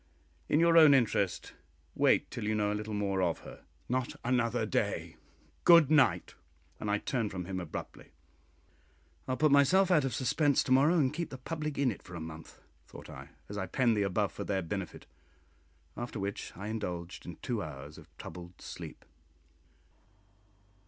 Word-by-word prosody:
"In 150 - +3
your 165 0 +6
own 150 -3 +8
interest, 105 -7 0 0.4
wait - - +2
till - - -5
you 110 +1 0
know 105 -1 +1
a - - 0
little 105 0 -4
more 100 -2 0
of 85 -2 0
her." - - -12 0.2
"Not 130 0 -1
another 120 -2 +1
day! 105 - -2 0.5
Good 170 -4 +7
night!" 145 -5 +3 0.5
and 105 - -3
I 105 - +2
turned 115 0 -2
from 90 -2 -5
him 95 0 -4
abruptly. 85 -4 -7 1.2
"I'll 130 -1 -1
put 155 +3 +3
myself 175 +7 +5
out 155 -5 +5
of 130 -4 -2
suspense 140 +3 +2
to - - -4
morrow, 145 +7 +5
and 135 -4 +2
keep 170 +1 -3
the 135 - -7
public 150 +2 -4
in 140 -3 +2
it - - -9
for 90 - -11
a - - -5
month," 80 0 -10 0.2
thought - - -11
I, - - -10 0.2
as 100 0 -5
I 95 - -3
penned 120 +3 +2
the 105 - +1
above 100 +1 0
for - - -6
their 95 -2 -1
benefit, 95 +2 -5 0.9
after 120 -1 -5
which 100 +1 -4
I 100 +3 -5
indulged 90 -7 -5
in 85 - -6
two 120 -4 -2
hours 75 -2 -8
of - - -16
troubled 90 0 -10
sleep. - - -9
110 Hz, 175 wpm, -31 LUFS, 95-140 Hz, 1.2 s, own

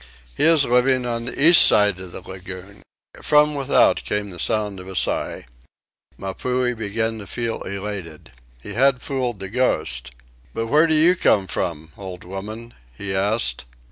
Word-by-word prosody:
He - - +1
is 160 -3 +5
living 125 +1 +2
on 115 -1 -3
the 125 - -6
east 165 +4 +8
side 105 -3 +4
of 95 -1 -9
the 90 - -7
lagoon." 95 +1 -10 0.4
From 150 0 +4
without 140 -2 +3
came 105 -1 -3
the 90 - -9
sound 105 -2 -1
of 90 - -11
a 95 - -8
sigh. - - -1 0.7
Mapuhi 125 +6 -2
began 110 +1 -2
to 100 - -10
feel 115 +1 -3
elated. 95 -5 -6 0.3
He - - -7
had 130 +1 +2
fooled 130 -7 -2
the 95 - -6
ghost. 80 - 0 0.5
"But 115 - -2
where 155 +5 +4
do 160 - +2
you 165 +4 +5
come 100 - +2
from, 80 -3 -4
old 95 -2 -8
woman?" 105 +6 -8 0.2
he 100 -1 -4
asked. 95 - 0
105 Hz, 165 wpm, -21 LUFS, 95-125 Hz, 0.7 s, east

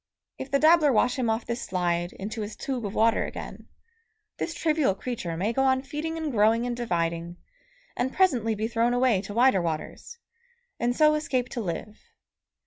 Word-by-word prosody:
If 265 - -6
the 280 - +3
dabbler 310 0 +5
wash 250 +3 +2
him 240 -3 +1
off 225 +1 -1
this 235 +1 -3
slide 175 -1 -1
into 215 +3 -6
his 210 +1 -5
tube 250 -6 -3
of 195 - -7
water 225 +1 +3
again, - - -8 0.7
this 330 - -3
trivial 305 - +1
creature 195 -8 -4
may 205 +7 0
go 270 - +1
on 260 0 +2
feeding 305 +4 -4
and 315 -2 -3
growing 225 +1 +3
and 245 -1 -2
dividing, 170 -6 -2 0.6
and 260 +1 -1
presently 250 - +2
be 215 +2 -2
thrown 235 +1 +1
away 245 -6 +3
to 205 +1 -8
wider 240 -5 +4
waters, 165 - -5 0.6
and 240 +1 0
so 305 +1 +5
escape 265 -5 -1
to 240 - -4
live 210 +3 -5
235 Hz, 180 wpm, -26 LUFS, 205-265 Hz, 0.7 s, dabbler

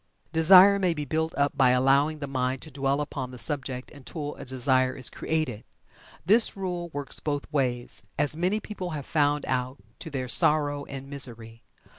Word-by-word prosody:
Desire 185 +5 +7
may 180 -3 +1
be 150 -1 -4
built 160 +3 -1
up 140 0 +1
by 130 -2 +4
allowing 135 +4 +3
the 150 - -5
mind 130 -1 -2
to 155 - -11
dwell 140 +1 -1
upon 140 -3 -5
the 125 - -10
subject 130 -2 -3
until 145 +1 -7
a - - -10
desire 130 0 +1
is 130 - -3
created. 155 -9 -3 0.6
This 215 +3 +5
rule 180 -3 -4
works 145 -3 -4
both 145 -2 -3
ways, 125 -4 -2 0.2
as 145 +1 +1
many 180 +6 0
people 195 -4 -6
have 140 - -7
found 145 -1 +1
out 130 0 -2 0.2
to 165 0 -7
their 130 -3 -4
sorrow 145 +2 +3
and 135 -1 -8
misery. 115 -5 -4
145 Hz, 175 wpm, -26 LUFS, 130-160 Hz, 0.6 s, Desire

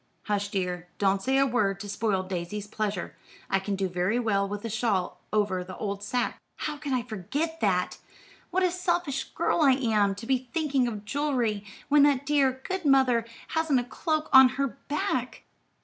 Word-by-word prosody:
"Hush, 205 -1 -1
dear, 180 -3 -2
don't 195 -1 +2
say 265 +4 +1
a 275 - +5
word 210 -7 +1
to 205 - -6
spoil 200 -1 0
Daisy's 185 +2 -4
pleasure. 210 -3 -3 0.4
I 195 - +3
can 195 +1 -2
do 195 0 -1
very 180 +5 0
well 200 -5 +1
with 205 +2 -5
a - - 0
shawl 195 -5 -1
over 205 -4 +1
the 185 0 -9
old 200 -1 -3
sack." 240 +4 -1 0.2
"How 305 -1 -4
could 290 -1 -5
I 255 -2 +1
forget 260 - -3
that! 185 -4 +1 0.5
What 375 +2 +1
a 365 - +3
selfish 350 -5 -1
girl - - +1
I 275 -3 +6
am, 215 -6 +2
to 200 - -8
be 260 0 0
thinking 280 -6 +2
of 210 -3 -5
jewelry, 240 -7 -1 0.2
when 295 0 +5
that 280 -1 +4
dear, 270 -3 +2
good 375 -1 -2
mother 265 -5 +4 0.2
hasn't 320 -5 +2
a - - -1
cloak 310 +5 -2
to 265 -1 +10
her 275 +2 -1 0.2
back. 255 -4 -2
230 Hz, 185 wpm, -27 LUFS, 200-275 Hz, 0.5 s, to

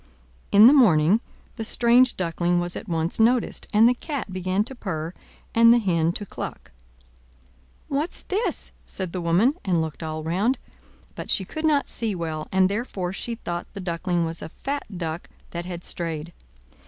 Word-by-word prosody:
In 205 +2 +8
the 255 - +9
morning 200 - +5 0.4
the 225 - -3
strange 240 +2 +4
Duckling 175 0 0
was 175 0 -2
at 210 - -7
once 165 +3 -1
noticed, 235 +2 +2
and 220 +2 +6
the 245 - +4
Cat 260 - -5
began 185 +2 0
to 250 - -8
purr 170 -8 -4 0.4
and 230 0 +7
the 240 - +6
Hen 170 -7 +1
to 205 - -4
cluck. - - -7 1.2
"What's 290 +5 -2
this?" 410 +5 -2 0.2
said 185 -3 -5
the 180 - -3
woman, 175 - +3
and 180 -4 +1
looked 160 0 -4
all 155 -1 -4
round; 195 +11 +1 0.6
but - - -7
she 190 - +3
could 315 - -4
not 295 -3 +3
see 220 -4 -2
well, 160 -3 -4
and 190 0 +4
therefore 195 -3 -3
she 235 +4 -4
thought 175 -6 -5
the - - -7
Duckling 175 -1 -1
was 165 0 -5
a - - -6
fat 280 - -4
duck 165 0 -4 0.2
that 170 0 -5
had 175 -1 -6
strayed. 165 -1 -3
185 Hz, 175 wpm, -24 LUFS, 170-235 Hz, 1.2 s, the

